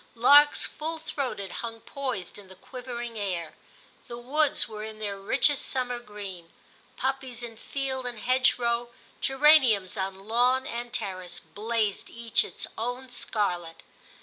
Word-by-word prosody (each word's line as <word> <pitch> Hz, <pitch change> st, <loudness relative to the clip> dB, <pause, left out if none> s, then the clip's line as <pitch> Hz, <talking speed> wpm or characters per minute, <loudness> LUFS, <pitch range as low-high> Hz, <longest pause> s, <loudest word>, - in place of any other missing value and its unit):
Larks 285 Hz, +5 st, +7 dB
full 320 Hz, +2 st, -4 dB
throated 260 Hz, -, -4 dB
hung 230 Hz, -1 st, -6 dB
poised 255 Hz, -10 st, -4 dB
in 200 Hz, -, -14 dB
the 190 Hz, -, -13 dB
quivering 240 Hz, 0 st, -6 dB
air, 180 Hz, -5 st, -2 dB, 0.5 s
the 235 Hz, -, -6 dB
woods 285 Hz, +5 st, +2 dB
were 215 Hz, -1 st, -7 dB
in 220 Hz, 0 st, -7 dB
their 205 Hz, -2 st, -3 dB
richest 270 Hz, +8 st, +2 dB
summer 250 Hz, -2 st, -1 dB
green; 200 Hz, -7 st, -8 dB, 0.5 s
poppies 260 Hz, -2 st, -2 dB
in 230 Hz, -1 st, -7 dB
field 265 Hz, +1 st, -3 dB
and 240 Hz, -2 st, -4 dB
hedgerow, 240 Hz, 0 st, +2 dB, 0.3 s
geraniums 265 Hz, -9 st, +5 dB
on 195 Hz, +1 st, -4 dB
lawn 250 Hz, +3 st, +3 dB
and 240 Hz, +1 st, -4 dB
terrace, 185 Hz, -2 st, -3 dB
blazed 215 Hz, -1 st, -2 dB
each 235 Hz, -2 st, +1 dB
its -, -, -4 dB
own 245 Hz, +3 st, -3 dB
scarlet. 180 Hz, -9 st, -2 dB
235 Hz, 135 wpm, -28 LUFS, 205-260 Hz, 0.5 s, Larks